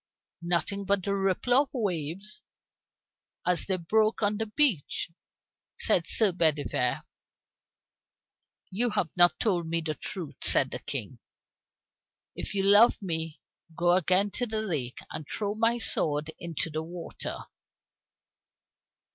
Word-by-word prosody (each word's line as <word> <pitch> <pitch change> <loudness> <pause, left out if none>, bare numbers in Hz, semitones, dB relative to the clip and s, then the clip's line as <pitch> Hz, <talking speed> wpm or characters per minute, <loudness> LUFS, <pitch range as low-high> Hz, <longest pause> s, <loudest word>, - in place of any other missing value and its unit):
"Nothing 175 +4 0
but 200 -1 +1
the 200 - -1
ripple 195 +5 0
of 275 +2 +4
the - - -6
waves 190 0 -3 1.0
as 180 -1 +2
they 190 -2 0
broke 215 +6 +1
on 205 0 +1
the 225 - -2
beach," 210 - +1 0.7
said 170 - +1
Sir 215 -4 +4
Bedivere. 150 -7 +1 1.7
"You 235 +6 0
have 195 -7 -1
not 175 -1 +4
told 175 -7 0
me 165 +1 0
the 160 -1 -3
truth," 165 +2 -7
said - - +4
the - - -4
King. - - -5 1.2
"If - - -5
you 195 - +1
love 205 +4 +6
me, 160 -5 -4 0.3
go 175 +1 +2
again 185 +3 +3
to 245 +3 -2
the 220 -1 -2
lake, 145 - -3
and - - -5
throw 205 -1 -2
my 230 +2 +2
sword 155 -8 -1
into 165 -1 -3
the 155 +1 -2
water." 170 +1 -7
185 Hz, 130 wpm, -28 LUFS, 165-210 Hz, 1.7 s, love